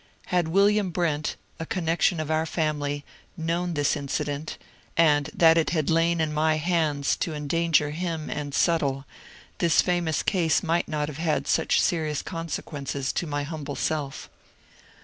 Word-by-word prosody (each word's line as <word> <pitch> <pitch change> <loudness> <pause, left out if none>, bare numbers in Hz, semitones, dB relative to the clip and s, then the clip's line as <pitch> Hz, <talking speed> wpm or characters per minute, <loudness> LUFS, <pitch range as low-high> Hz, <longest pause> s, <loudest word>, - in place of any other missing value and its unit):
Had 175 -2 +2
William 200 +3 +3
Brent, 160 -4 -1 0.2
a 165 - -3
connection 170 -1 +1
of 155 0 -3
our 160 +1 +1
family, 145 -3 -2 0.3
known 170 +1 -1
this 145 -1 +2
incident, 145 +1 -3 0.4
and 150 -3 +4
that 165 0 +5
it 160 - +1
had 155 -2 0
lain 165 +1 +2
in 155 -1 0
my 155 +1 +2
hands 155 -3 +1
to 160 - -2
endanger 150 0 +1
him 165 -1 -3
and 145 -1 -4
Suttle, 140 -5 +1 0.5
this 170 -2 +3
famous 175 -4 0
case 175 -4 +2
might 170 0 +1
not 150 -1 -2
have 150 0 -7
had 155 -4 0
such - - +2
serious 155 -4 0
consequences 145 -5 -4
to 175 - -2
my 145 -1 -2
humble 145 -2 -5
self. 145 -3 -3
160 Hz, 150 wpm, -26 LUFS, 145-170 Hz, 0.5 s, that